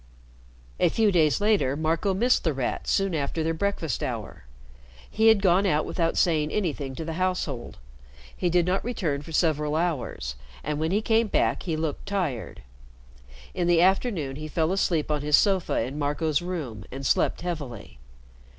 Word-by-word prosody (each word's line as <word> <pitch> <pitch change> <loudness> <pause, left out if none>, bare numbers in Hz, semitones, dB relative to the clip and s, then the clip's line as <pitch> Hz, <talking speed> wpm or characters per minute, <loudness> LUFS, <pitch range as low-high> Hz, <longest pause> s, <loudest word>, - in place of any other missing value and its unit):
A - - +4
few 220 -2 +2
days 160 -3 +3
later, 205 -10 +2
Marco 165 +5 0
missed 245 +6 +2
The 160 - +1
Rat 130 -2 -3
soon 195 -2 +1
after 155 +1 -1
their 165 +1 0
breakfast 165 - -2
hour. - - -5 0.6
He 220 +1 +2
had 220 -3 +5
gone 190 +2 +4
out 155 -4 +1
without 165 -2 -1
saying 155 -3 +2
anything 150 -9 -2
to 160 - -5
the 165 - -4
household. 175 -9 -2 0.6
He 180 - 0
did 175 0 +3
not 185 +2 0
return 170 -12 -2
for 165 - -11
several 150 -2 +1
hours, 155 - -2 0.3
and 150 0 -2
when 160 +1 0
he 205 +4 +1
came 225 0 +2
back - - +1
he 165 -4 -2
looked 155 +2 -3
tired. 160 - -3 0.9
In 175 - -1
the 175 -1 +5
afternoon 185 - +1
he 155 +1 -6
fell 160 +2 0
asleep 170 -5 0
on 150 -1 0
his 150 0 +4
sofa 195 -4 +2
in 130 +6 -4
Marco's 150 +1 0
room 150 - -5
and 135 +1 -6
slept - - +1
heavily. 145 - -6
165 Hz, 170 wpm, -26 LUFS, 150-190 Hz, 0.9 s, had